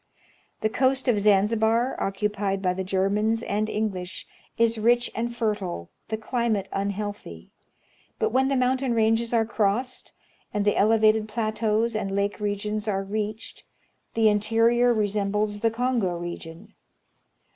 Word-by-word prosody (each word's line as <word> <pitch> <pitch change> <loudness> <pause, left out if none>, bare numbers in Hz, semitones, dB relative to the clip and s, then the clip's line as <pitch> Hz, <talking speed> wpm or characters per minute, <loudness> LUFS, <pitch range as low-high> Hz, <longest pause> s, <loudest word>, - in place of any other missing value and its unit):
The 215 - +1
coast 260 +3 +1
of 230 -4 +3
Zanzibar, 220 +4 +2
occupied 195 0 -1
by 185 -2 0
the 190 +1 -3
Germans 205 +4 0
and 215 +1 -1
English, 190 -5 -3 0.3
is 230 -1 +2
rich 240 +2 +2
and 235 +1 -2
fertile, 205 - -3 0.2
the 220 - -2
climate 225 -3 -1
unhealthy; 200 - -4 0.7
but 220 - 0
when 265 +2 +3
the 275 - +1
mountain 255 -1 +1
ranges 225 +1 +2
are 230 -2 +2
crossed, 230 +3 -1 0.4
and 205 -1 0
the 205 - +3
elevated 215 0 +3
plateaus 220 +1 0
and 195 -2 -2
lake 200 +1 -1
regions 210 +1 -2
are 195 -2 0
reached, 210 +2 -5 0.5
the 225 -1 +4
interior 230 +3 +3
resembles 210 -1 0
the 225 - +2
Kongo 225 -6 0
region. 175 +3 -8
215 Hz, 135 wpm, -25 LUFS, 200-230 Hz, 0.7 s, the